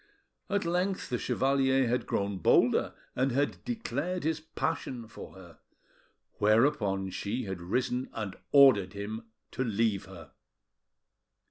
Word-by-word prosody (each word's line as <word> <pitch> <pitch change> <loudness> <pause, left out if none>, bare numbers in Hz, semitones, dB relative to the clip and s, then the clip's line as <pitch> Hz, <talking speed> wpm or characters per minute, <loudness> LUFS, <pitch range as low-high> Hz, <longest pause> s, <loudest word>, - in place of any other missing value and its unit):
At 200 -2 0
length 180 +3 -1
the 125 - 0
chevalier 135 -1 +2
had 125 +2 -1
grown 100 -1 -1
bolder, - - +3 0.2
and 130 +1 +1
had 140 +4 -1
declared 180 - -3
his 160 0 0
passion 135 -6 -4
for - - -11
her; 90 -3 -14 0.8
whereupon 105 -4 +2
she 105 +7 -3
had 95 -3 -5
risen 125 +7 -1
and 105 -4 -4 0.2
ordered 130 -10 +6
him 105 +3 -5 0.3
to 130 - -2
leave 110 -3 0
her. 85 -6 -12
120 Hz, 125 wpm, -30 LUFS, 100-140 Hz, 0.8 s, ordered